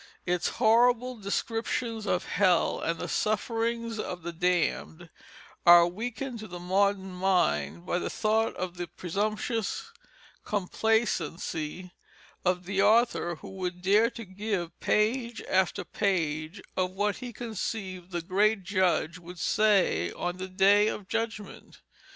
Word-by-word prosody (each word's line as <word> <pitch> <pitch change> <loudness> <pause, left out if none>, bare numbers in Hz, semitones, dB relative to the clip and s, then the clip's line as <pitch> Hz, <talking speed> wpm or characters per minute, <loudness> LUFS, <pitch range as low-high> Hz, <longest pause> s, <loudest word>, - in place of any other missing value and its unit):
Its 180 -1 0
horrible 245 +2 +4
descriptions 225 +1 -2
of 180 - 0
hell 180 -3 +2
and 165 0 -1
the - - -4
sufferings 230 +1 -1
of 180 -4 -5
the 170 0 -5
damned 175 -1 -1 0.5
are 175 0 +9
weakened 235 +7 -4
to 215 - -7
the 180 - -7
modern 190 +2 +1
mind 85 - 0
by 175 - 0
the - - -3
thought 220 +1 +1
of 180 -1 -5
the 175 0 -4
presumptuous 215 - -2 0.5
complacence 210 -1 0 0.9
of 180 0 0
the 195 +1 0
author 215 -4 +3
who - - -11
would 180 -1 -5
dare 210 +4 +4
to 230 -2 -9
give 190 -2 -4
page 235 +2 +1
after 190 +1 +1
page 165 -3 -1 0.2
of 185 -1 +1
what 200 +2 -1
he 245 -1 -7
conceived 195 -5 -5
the 175 -2 -3
great 200 +3 +2
Judge 180 -3 +1
would 175 +1 -11
say 195 - +2
on 175 0 -3
the 185 0 -5
Day 195 +3 +4
of 205 -3 -4
Judgment. 225 -2 -5
195 Hz, 135 wpm, -28 LUFS, 180-220 Hz, 0.9 s, are